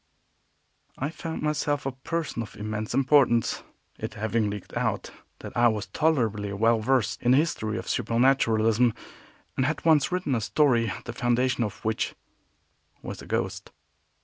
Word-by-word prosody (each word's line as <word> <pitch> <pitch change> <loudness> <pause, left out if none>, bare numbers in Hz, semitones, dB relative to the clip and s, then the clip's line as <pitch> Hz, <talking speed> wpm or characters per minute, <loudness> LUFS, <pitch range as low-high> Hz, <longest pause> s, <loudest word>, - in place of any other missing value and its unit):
I 140 +4 -2
found 165 0 -5
myself 145 -1 0
a 135 - -1
person 140 0 -3
of 115 - -8
immense 110 +1 -4
importance, 135 -4 +3 0.4
it - - -5
having 110 0 0
leaked 100 -1 -7
out - - -1 0.3
that - - -9
I 120 0 +5
was 110 -2 0
tolerably 110 -10 0
well 115 +3 +3
versed 125 +1 +1
in 120 - +1
the - - +6
history 110 -9 0
of - - -6
supernaturalism, 115 -1 +2 0.6
and 130 - +1
had 155 +2 -3
once 155 -3 +4
written 180 -6 -1
a 115 - +1
story 120 -3 +2
the 120 - -5
foundation 120 +1 +1
of 105 -1 -6
which 110 0 -1 0.9
was - - -6
a - - -11
ghost. - - -3
120 Hz, 150 wpm, -26 LUFS, 110-140 Hz, 0.9 s, the